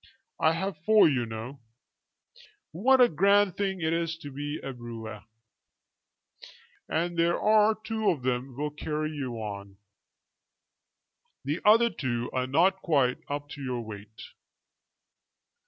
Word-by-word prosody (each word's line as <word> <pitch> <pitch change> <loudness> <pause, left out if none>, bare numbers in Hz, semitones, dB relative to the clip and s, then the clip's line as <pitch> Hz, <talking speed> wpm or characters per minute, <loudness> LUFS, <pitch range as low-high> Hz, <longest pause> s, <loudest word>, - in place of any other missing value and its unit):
"I 160 0 +4
have 190 -1 -3
four, 215 +1 +6
you 130 -6 0
know." 115 +5 -7 1.1
"What 255 +11 +3
a 250 - +8
grand 200 +1 +3
thing 195 -2 -2
it 160 0 0
is 165 -1 -1
to 145 -3 -9
be 145 +2 -5
a 135 - -5
brewer!" 115 -3 -8 1.7
"And 170 +1 -1
there 170 +1 +2
are 215 0 +4
two 220 0 -1
of 140 -7 -1
them 125 0 -2
will 150 +1 -2
carry 155 +1 -3
you. 110 -8 -6 1.7
The 150 +5 -1
other 230 +2 +5
two 120 -3 -3
are 130 0 -1
not 185 +8 +2
quite 140 -7 +1
up 145 0 -4
to 145 - -9
your 125 -3 -3
weight." 110 -1 -10
150 Hz, 130 wpm, -28 LUFS, 125-190 Hz, 1.7 s, a